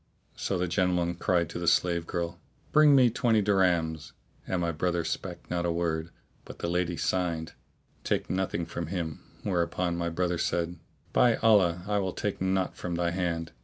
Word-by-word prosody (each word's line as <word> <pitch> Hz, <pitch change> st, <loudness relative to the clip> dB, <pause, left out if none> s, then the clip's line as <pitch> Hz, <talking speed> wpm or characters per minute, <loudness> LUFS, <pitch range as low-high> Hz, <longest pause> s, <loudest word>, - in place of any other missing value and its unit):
So 95 Hz, -, -2 dB
the 90 Hz, +1 st, 0 dB
gentleman 90 Hz, -1 st, +1 dB
cried 90 Hz, 0 st, +1 dB
out 85 Hz, -, -8 dB
to 85 Hz, -, -5 dB
the 85 Hz, -, -3 dB
slave 85 Hz, 0 st, +2 dB
girl, 85 Hz, 0 st, -3 dB, 0.3 s
"Bring 150 Hz, -2 st, +6 dB
me 125 Hz, -3 st, +6 dB
twenty 115 Hz, -2 st, +2 dB
dirhams," 85 Hz, -6 st, +1 dB, 0.3 s
and 95 Hz, -, 0 dB
my 85 Hz, -1 st, 0 dB
brother 85 Hz, +1 st, 0 dB
spake 85 Hz, +2 st, -5 dB
not 85 Hz, -1 st, 0 dB
a 85 Hz, -, +1 dB
word; 85 Hz, -1 st, -1 dB, 0.3 s
but -, -, -11 dB
the -, -, -3 dB
lady 90 Hz, -1 st, 0 dB
signed, 85 Hz, -3 st, -1 dB, 0.5 s
"Take -, -, 0 dB
nothing 95 Hz, -2 st, -1 dB
from 85 Hz, -1 st, -5 dB
him;' 85 Hz, -4 st, -3 dB, 0.2 s
whereupon 90 Hz, -1 st, 0 dB
my 85 Hz, 0 st, -1 dB
brother 85 Hz, 0 st, -1 dB
said, 85 Hz, 0 st, -1 dB, 0.3 s
"By 120 Hz, -2 st, +5 dB
Allah 90 Hz, -6 st, +3 dB
I 105 Hz, 0 st, +1 dB
will 95 Hz, -2 st, -2 dB
take 105 Hz, -3 st, -3 dB
naught 95 Hz, 0 st, 0 dB
from 90 Hz, -1 st, -4 dB
thy 85 Hz, 0 st, 0 dB
hand. 85 Hz, -2 st, -2 dB
85 Hz, 180 wpm, -28 LUFS, 85-95 Hz, 0.5 s, Bring